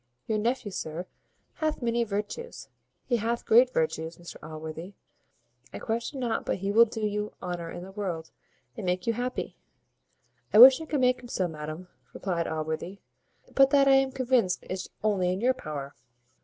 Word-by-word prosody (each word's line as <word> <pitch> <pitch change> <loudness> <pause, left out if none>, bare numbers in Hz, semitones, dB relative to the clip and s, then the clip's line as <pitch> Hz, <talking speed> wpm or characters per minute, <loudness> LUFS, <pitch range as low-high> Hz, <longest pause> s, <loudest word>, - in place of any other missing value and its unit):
Your 215 -1 0
nephew, 235 -1 -1
sir, 170 -1 -5 0.5
hath 310 -5 -1
many 235 0 +1
virtues 215 - -5 0.4
he 240 - +1
hath 230 +2 -2
great 245 +3 +6
virtues, 160 -1 -1
Mr 175 0 -10
Allworthy. 160 +4 -8 0.8
I - - -6
question 235 +5 -3
not 235 -3 -1
but - - -1
he 195 +1 -2
will 230 +3 +7
do 220 0 -6
you 210 0 -2
honour 175 -2 -4
in 175 - -7
the 190 - -10
world, 180 -5 -4 0.4
and 220 - -6
make 180 0 -1
you 230 - +2
happy." 250 +2 -4 0.9
"I - - +4
wish 260 +5 +10
I - - -5
could 295 -3 -1
make 250 0 +3
him 245 - -10
so, 185 -6 -1
madam," 155 +2 -7 0.3
replied 175 -4 -2
Allworthy; 160 +4 -3 0.6
"but 270 0 +6
that 275 0 +5
I 270 - +7
am 270 0 +4
convinced 255 -7 +1
is 185 0 -4
only 190 -4 +2
in 185 - -2
your 250 +4 +3
power. 145 - -6
210 Hz, 175 wpm, -28 LUFS, 175-245 Hz, 0.9 s, wish